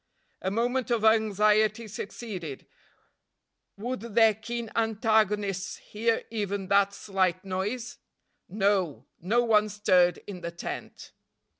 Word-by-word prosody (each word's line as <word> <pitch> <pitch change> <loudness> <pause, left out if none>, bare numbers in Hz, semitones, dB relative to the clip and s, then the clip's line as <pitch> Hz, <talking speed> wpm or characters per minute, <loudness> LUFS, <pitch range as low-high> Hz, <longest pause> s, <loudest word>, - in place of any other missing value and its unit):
A 190 - -1
moment 240 +4 0
of 235 -3 +1
anxiety 215 0 +3
succeeded; 195 - -7 1.1
would 245 +5 -3
their 225 0 +4
keen 230 +1 -5
antagonists 215 -3 +1
hear 225 +2 -1
even 200 -3 -3
that 200 0 +4
slight 190 -2 -1
noise? 210 +6 -3 0.5
No! 195 -5 0
no 225 +8 +2
one 215 -2 +3
stirred 185 -4 +3
in 190 -3 -8
the 170 - -4
tent. 170 0 -7
210 Hz, 110 wpm, -28 LUFS, 195-225 Hz, 1.1 s, their